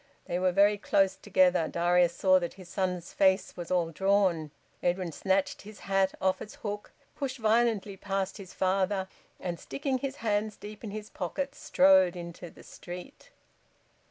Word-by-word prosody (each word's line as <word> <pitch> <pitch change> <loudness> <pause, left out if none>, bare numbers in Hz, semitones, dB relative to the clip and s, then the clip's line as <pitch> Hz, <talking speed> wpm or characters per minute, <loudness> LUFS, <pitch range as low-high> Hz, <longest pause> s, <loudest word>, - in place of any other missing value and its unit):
They 175 - -2
were 185 0 +2
very 200 +2 +4
close 195 -1 +2
together. 180 -4 +3
Darius 175 0 +2
saw 185 -1 +4
that 175 -1 -5
his 185 -2 -12
son's 180 -3 -2
face 190 0 +2
was 175 -1 -7
all 175 -3 +1
drawn. 190 -3 +2 0.3
Edwin 175 -1 0
snatched 190 +4 0
his 210 0 -12
hat 195 -1 +1
off 190 0 +1
its 210 - -8
hook, 205 -1 -6 0.2
pushed 270 -1 -3
violently 220 -3 +2
past 195 0 -2
his 195 -3 -10
father 190 +1 0 0.3
and, 175 -2 -4
sticking 275 -2 -2
his 275 +1 -3
hands 215 -3 -1
deep 210 +1 -10
in 220 - -5
his 210 +1 -7
pockets, 275 +10 -4
strode 185 -1 +5
into 170 0 -8
the - - -16
street. 180 - -10
190 Hz, 160 wpm, -29 LUFS, 180-205 Hz, 0.3 s, strode